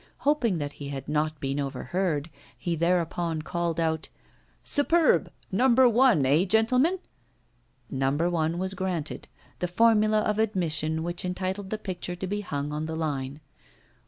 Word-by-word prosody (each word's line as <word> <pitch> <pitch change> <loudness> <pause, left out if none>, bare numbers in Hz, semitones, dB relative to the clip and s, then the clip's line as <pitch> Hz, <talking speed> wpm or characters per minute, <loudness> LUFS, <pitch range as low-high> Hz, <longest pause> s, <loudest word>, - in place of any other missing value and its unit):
Hoping 265 - +2
that 145 -2 -3
he 140 -1 -7
had 135 -1 -6
not 155 +1 -1
been 135 +1 -2
overheard, 150 +3 -2 0.3
he 170 -1 -2
thereupon 170 -1 0
called 170 0 -2
out: 160 -1 -1 0.5
'Superb! 320 +3 +2 0.2
No. 245 +8 +3
1, 240 - +5
eh, 145 +6 +4
gentlemen?' 250 - +3 0.9
No. 135 0 +1
1 165 +1 0
was 190 +1 -1
granted 185 -5 -3 0.3
the 180 - 0
formula 215 +2 +4
of 210 0 0
admission 160 -7 +1
which 175 +1 -3
entitled 190 +2 -3
the 215 - -2
picture 180 -3 -5
to 180 - -5
be 205 +2 -2
hung 145 -6 -3
on 155 +1 -3
the 160 - -4
line. 145 -3 -3
175 Hz, 145 wpm, -27 LUFS, 155-205 Hz, 0.9 s, 1